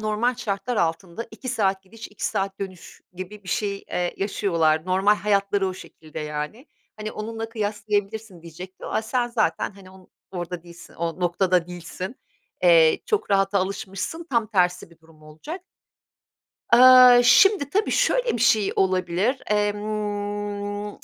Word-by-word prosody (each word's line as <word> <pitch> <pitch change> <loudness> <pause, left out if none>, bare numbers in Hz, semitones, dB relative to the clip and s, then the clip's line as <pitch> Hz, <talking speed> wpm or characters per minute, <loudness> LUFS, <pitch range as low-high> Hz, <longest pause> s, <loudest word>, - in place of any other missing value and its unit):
normal 215 +4 0
şartlar 215 +3 -3
altında 170 +5 -2
2 255 - -9
saat 195 -6 0
gidiş, 225 +4 -11
2 210 - -8
saat 195 -2 -2
dönüş 185 -3 -8
gibi 185 +3 -9
bir - - -11
şey, 200 +1 -2
eee, 180 0 -2
yaşıyorlar. 170 -5 0
Normal 190 +3 +3
hayatları 200 -1 +1
o 185 - -5
şekilde, 155 -4 -11
yani. 150 - -5 0.3
Hani, 215 0 -6
onunla 225 +1 -5
kıyaslayabilirsin 210 -3 -3
diyecektim 180 +3 -10
ama 220 - -1
sen 240 +2 -1
zaten, 235 -3 0
hani, 190 -1 -15
on 190 -1 -18 0.2
orada 175 -2 -5
değilsin 170 -1 -14
o 170 +2 -4
noktada 180 0 +1
değilsin. 180 +5 -7 0.5
Eee, 165 -3 +5
çok 425 - -1
rahata 195 0 +2
alışmışsın, 195 - -4
tam 230 -3 +1
tersi 180 -4 0
bir 170 - -20
durum 160 -1 -21
olacak. 160 - -9 1.1
Eee, 250 0 +9
şimdi, 335 - +5
tabii, 415 +2 +1
şöyle - - +2
bir 230 - -1
şey 215 -4 +3
olabilir; 185 +7 0
emm, 205 0 -2
200 Hz, 145 wpm, -24 LUFS, 180-220 Hz, 1.1 s, Eee